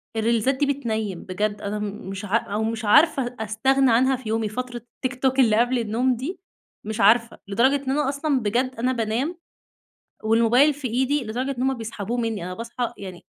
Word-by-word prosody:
الريلزات 230 +4 +1
دي 285 - +1
بتنيّم. 220 -9 -2
بجد 205 +2 -2
أنا 205 +1 -3
م 205 -2 -5
مش 195 +1 -5
عا 205 +3 +2
أو 210 -1 -3
مش 225 0 -2
عارفة 255 0 +4
استغنى 260 +5 +2
عنها 260 +4 +4
في 250 -3 -7
يومي 220 -1 0
فترة 250 +2 -5 0.3
التيك 255 0 -3
توك 265 0 +2
اللي 220 -4 +5
قبل 245 +1 +2
النوم 235 +3 +1
دي، 310 +10 -5 0.5
مش 220 0 -3
عارفة، 230 +3 +4
لدرجة 235 +8 +3
إن 260 - 0
أنا 290 0 +1
أصلًا 280 0 0
بجد 250 +4 0
أنا 250 +2 +1
بانام 240 +8 -1 0.9
والموبايل 235 +6 +4
في 275 -3 -4
إيدي، 265 +3 0
لدرجة 250 +5 -3
إن - - -1
هم 265 0 +1
بيسحبوه 225 0 -4
مني، 225 -6 -2
أنا 180 - -5
باصحى 235 +2 -4
يعني 185 -3 -9
235 Hz, 190 wpm, -23 LUFS, 215-260 Hz, 0.9 s, اللي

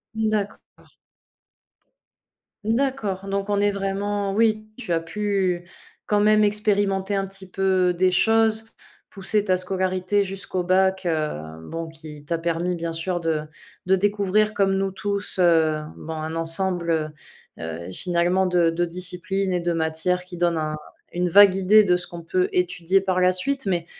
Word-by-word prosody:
D'accord. 215 -2 -3 1.7
D'accord, 220 -5 -1
donc 200 +1 -2
on 205 -1 +1
est 205 - +3
vraiment 200 0 -2
oui, 215 0 +1
tu 220 -8 -6
as 165 - +2
pu, 185 0 -1 0.4
quand 210 - +2
même, 215 +1 +4
expérimenter 205 -2 +1
un 195 0 -1
petit 195 0 -9
peu 185 -1 +2
des 185 +1 +2
choses, 225 +3 +2 0.4
pousser 205 +1 0
ta 185 -2 +2
scolarité 185 +1 0
jusqu'au 190 -1 -4
bac, 190 +1 +2
heu, 115 - -3
bon 165 0 -4
qui 155 -2 -11
t'a 165 +2 -2
permis, 170 +2 -1
bien 165 -1 -4
sûr, 175 +2 -2
de 165 -2 -1 0.4
de 190 +1 +4
découvrir, 205 +2 +1
comme 195 -2 +2
nous 195 0 0
tous, 200 +1 -3
heu, 160 -3 +4 0.2
bon, 160 - -7
un 160 +1 -4
ensemble, 170 +1 -1 0.7
heu - - -6
heu, 85 +2 -6
finalement 175 - +1
de 175 -2 +3
de 175 +1 0
disciplines 180 +2 -1
et 180 - +1
de 175 0 -1
matières 165 +3 -1
qui 180 0 -9
donnent 170 -1 +1
un 155 -1 -2 0.4
une 180 0 0
vague 200 +1 +7
idée 205 +3 +5
de 180 -2 +3
ce 180 0 -3
qu'on 170 -1 -9
peut 370 - 0
étudier 195 - +1
par 185 -1 0
la 180 0 +5
suite, 270 +9 0
mais 175 -4 0
185 Hz, 160 wpm, -23 LUFS, 170-205 Hz, 1.7 s, vague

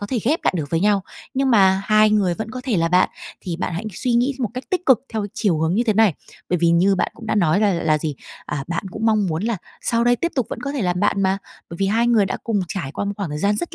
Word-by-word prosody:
có 205 - -4
thể 250 0 -1
ghép 305 +7 0
lại - - +2
được 150 -3 -4
với 165 0 +1
nhau, 200 -1 +2 0.3
nhưng 270 0 +1
mà 195 -4 +4
hai 215 0 +4
người 195 -5 +2
vẫn 220 +3 -5
có 255 +2 -6
thể 235 -7 0
là 165 0 +1
bạn, 180 +1 +4 0.3
thì 170 -3 -4
bạn 175 - -3
hãy 195 +6 -4
suy 245 +7 -2
nghĩ 250 +4 +2
một 240 -5 -1
cách 255 - -5
tích 365 -1 -1
cực 260 -5 +6
theo 215 -2 -2
chiều 185 -8 +1
hướng 160 +3 +1
như 235 - +2
thế 220 - +2
này, 210 -6 +4 0.3
bởi 180 - +1
vì 170 0 +3
như 185 +4 +4
bạn - - 0
cũng 225 - -11
đã - - 0
nói 185 -1 +2
là 205 -2 +3
là 160 -3 +1
gì, 150 -1 -3 0.3
à, 140 -2 -4
bạn 175 +3 -2
cũng 225 - -3
mong 215 -3 +3
muốn 160 +2 -2
là 230 -1 0 0.2
sau 235 0 +1
đây 245 0 +4
tiếp 340 +5 -2
tục 255 -5 0
vẫn - - -5
có 280 0 -3
thể 270 -7 -2
làm 180 0 0
bạn 200 -1 +1
mà, 190 +1 +1 0.3
bởi 170 - -7
vì 195 - 0
hai 230 +4 +2
người 225 -4 +4
đã - - -3
cùng 215 -4 0
trải 160 -6 -4
qua - - -3
một 200 - -2
khoảng 200 -5 -3
thời 150 - -4
gian 205 +4 +1
rất 345 - -4
205 Hz, 305 wpm, -21 LUFS, 175-230 Hz, 0.3 s, cực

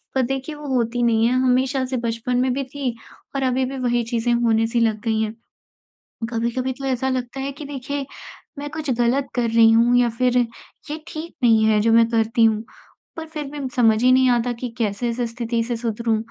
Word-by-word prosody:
पर 265 - +3
देखिए 270 +4 -3
वो 295 -1 -9
होती 240 0 0
नहीं 225 -1 +3
है 250 - +1
हमेशा 260 +1 +2
से - - +1
बचपन 230 +2 -1
में 255 0 +2
भी 275 +1 -2
थी 265 -5 -2 0.4
और 270 - 0
अभी 260 0 +1
भी 270 +1 -5
वही 240 -2 0
चीज़ें 235 +1 +1
होने 225 -1 +2
सी 235 +1 0
लग 220 -2 +1
गई 220 -2 0
हैं। 220 0 -2 0.9
कभी-कभी 240 +2 -1
तो 270 +2 -8
ऐसा 265 0 0
लगता 255 0 -3
है 275 +1 -3
कि 285 +1 -9
देखिए 280 0 -4 0.5
मैं 290 0 -5
कुछ 310 -3 -5
ग़लत 260 +3 +2
कर 235 -2 +1
रही 225 0 +6
हूँ 235 +2 +4
या 245 -1 +4
फिर 250 +2 +1
ये 245 +5 -4
ठीक 320 +2 -7
नहीं 225 -2 +5
है 215 -1 +4
जो 225 +1 +2
मैं 230 0 +6
करती 225 0 +2
हूँ, 220 0 +2 0.5
पर 320 - -5
फिर 305 -1 -5
भी 295 - -6 0.2
समझ 225 -3 +4
ही 255 - +6
नहीं 260 0 +5
आता 240 0 +2
कि 240 +1 -5
कैसे 225 +1 -1
इस 235 +2 -4
स्थिति 230 -1 -2
से 240 +1 -3
सुधरूँ, 230 -1 -1
245 Hz, 215 wpm, -22 LUFS, 230-265 Hz, 0.9 s, रही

